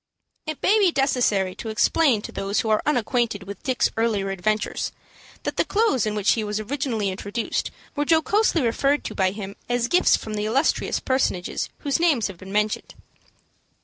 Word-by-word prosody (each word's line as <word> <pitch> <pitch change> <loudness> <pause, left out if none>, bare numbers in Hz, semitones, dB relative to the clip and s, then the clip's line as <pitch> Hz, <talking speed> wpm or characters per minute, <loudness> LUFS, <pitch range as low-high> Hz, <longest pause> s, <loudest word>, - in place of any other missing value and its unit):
It 310 -2 -5
may 430 +3 +4
be 385 -4 +4
necessary 215 -9 +2
to 225 - -7
explain 220 +2 +2
to - - -6
those 200 +4 -1
who 225 - -3
are 215 - +3
unacquainted 235 -6 0
with 195 0 -9
Dick's 260 -2 +1
earlier 215 -4 0
adventures, 210 +3 -1 0.5
that - - -3
the - - +4
clothes 400 - +1
in 210 - -2
which 210 -1 +2
he 225 - +1
was 210 0 -2
originally 230 -3 -2
introduced 205 +4 -3 0.3
were 290 - +1
jocosely 335 +1 +3
referred 275 +5 +1
to - - -5
by 190 -2 +2
him 200 0 -7
as 245 -1 +1
gifts 355 +7 +4
from 215 - -7
the 210 0 -2
illustrious 270 +8 +1
personages 260 -9 -1
whose 285 +2 0
names 305 -10 +3
have 185 -3 -10
been 190 +1 -10
mentioned. 210 +1 -1
225 Hz, 180 wpm, -24 LUFS, 205-275 Hz, 0.5 s, may